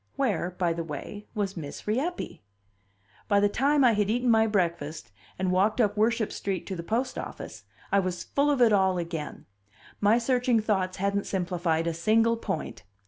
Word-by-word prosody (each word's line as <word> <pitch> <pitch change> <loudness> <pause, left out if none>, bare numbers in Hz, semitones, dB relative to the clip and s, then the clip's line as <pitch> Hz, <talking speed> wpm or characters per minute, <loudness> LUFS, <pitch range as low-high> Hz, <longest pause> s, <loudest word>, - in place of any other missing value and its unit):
Where, 215 -11 0
by 175 -2 +1
the 165 0 -3
way, 165 +7 -7
was 200 -2 -2
Miss 150 -5 -7
Rieppe? 275 +12 -2 0.9
By 205 -2 +4
the 205 - +4
time 280 +7 +2
I 245 - +6
had 205 -1 +1
eaten 245 +2 +2
my 220 0 +4
breakfast 170 - -2 0.3
and 185 -1 0
walked 195 +6 +2
up 210 -3 +2
Worship 220 +1 +1
Street 195 -3 -3
to 190 - -4
the 170 - -5
post 235 +9 -2
office - - -8 0.3
I 200 - +4
was 185 -2 -2
full 285 +1 +1
of 275 -4 +3
it 225 -3 +5
all 190 -2 +3
again; 165 -3 -5 0.5
my 210 +3 +4
searching 245 -1 +2
thoughts 190 -4 -1
hadn't 200 +1 -1
simplified 175 -3 -1
a 170 - 0
single 225 +7 +3
point. 195 -8 -4
200 Hz, 180 wpm, -27 LUFS, 180-230 Hz, 0.9 s, I